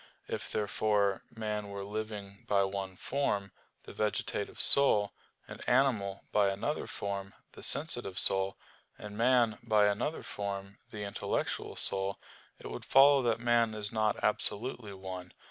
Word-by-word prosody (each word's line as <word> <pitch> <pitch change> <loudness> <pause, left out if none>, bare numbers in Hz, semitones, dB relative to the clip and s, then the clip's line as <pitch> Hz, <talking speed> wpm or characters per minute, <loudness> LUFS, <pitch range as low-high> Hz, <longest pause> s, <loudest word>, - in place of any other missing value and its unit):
If, - - -5
therefore, 105 -1 0
man 105 -3 -4
were 100 0 -6
living 105 -1 -7
by 100 -1 +3
one 95 -1 -4
form, 100 -5 -2 0.3
the - - -11
vegetative 105 -1 -3
soul, 105 -8 +7 0.3
and - - -10
animal 120 -7 +1
by 100 -2 +3
another 105 +10 -3
form, 100 -1 -5 0.2
the - - -13
sensitive 120 - +2
soul, 95 0 +1 0.4
and 105 0 -9
man 120 -1 +2
by 110 -3 +3
another 105 +10 -1
form, 100 -1 -6
the 105 -1 -7
intellectual 100 - -3
soul, 95 0 +1 0.4
it - - -15
would - - -7
follow 140 +1 +6
that 115 -2 0
man 120 -2 +2
is 105 -1 -2
not 110 -2 +1
absolutely 105 +1 -2
one. 95 -2 -8
105 Hz, 140 wpm, -31 LUFS, 100-115 Hz, 0.4 s, soul